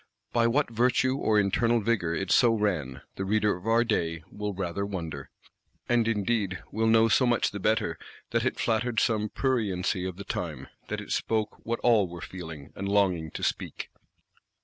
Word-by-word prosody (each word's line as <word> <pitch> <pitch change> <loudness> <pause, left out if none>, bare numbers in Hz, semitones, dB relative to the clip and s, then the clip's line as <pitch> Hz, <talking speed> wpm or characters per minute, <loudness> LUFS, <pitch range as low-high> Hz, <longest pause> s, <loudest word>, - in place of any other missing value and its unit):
By 115 -1 +3
what 135 +2 +1
virtue 125 +3 +2
or 110 -6 +2
internal 115 +4 +2
vigour 100 -7 0
it 100 - -2
so 120 -2 +5
ran, 90 -12 -1
the 95 - -2
reader 105 +1 +2
of 90 +4 -10
our 115 +1 +4
day 85 -8 -1
will 105 0 -3
rather 95 0 -3
wonder:—and 95 - -4
indeed 105 -3 0
will 110 +1 +1
know 115 0 +5
so 125 +3 +3
much 120 -1 +2
the 100 - -5
better 110 +3 0 0.3
that - - +1
it - - -1
flattered 115 0 +1
some 110 -3 +1
pruriency 100 -9 0
of 90 - -8
the 100 - -6
time; - - -4 0.2
that - - -3
it - - -9
spoke 110 -1 -1
what 115 0 -1
all 110 -5 +4
were 85 0 -9
feeling, 80 -6 -8
and 100 +1 -3
longing 95 -6 +2
to - - -7
speak. - - -3
105 Hz, 175 wpm, -28 LUFS, 95-115 Hz, 0.3 s, so